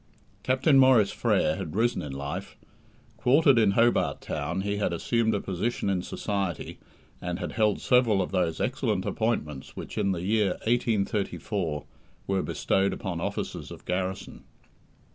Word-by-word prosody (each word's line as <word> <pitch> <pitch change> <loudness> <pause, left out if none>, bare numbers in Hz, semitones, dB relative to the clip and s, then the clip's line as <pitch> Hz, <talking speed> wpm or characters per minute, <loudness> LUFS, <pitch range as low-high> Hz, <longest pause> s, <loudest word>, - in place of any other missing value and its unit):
Captain 135 +2 +3
Maurice 130 -6 +5
Frere - - +1
had 80 - -5
risen 120 +3 +1
in 75 - -6
life. 70 +1 -5 0.6
Quartered 135 0 +5
in 105 -3 +4
Hobart 115 +3 +2
Town, 80 +5 -3
he 100 +1 -2
had 100 - 0
assumed 110 +5 +1
a - - 0
position 100 +3 -2
in 90 -2 0
society, 95 -3 -3 0.4
and 90 0 -3
had 90 - -4
held 105 -3 +1
several 125 -5 +3
of 95 - -1
those 85 -3 0
excellent 120 -7 -1
appointments 75 - -2
which - - -6
in 100 - +1
the 90 -2 -3
year 105 -1 +2
1834 100 -7 -1 0.4
were 95 -1 0
bestowed 95 +1 0
upon 85 -3 -4
officers - - -4
of - - -11
garrison. 95 +1 -3
100 Hz, 145 wpm, -27 LUFS, 90-115 Hz, 0.6 s, Maurice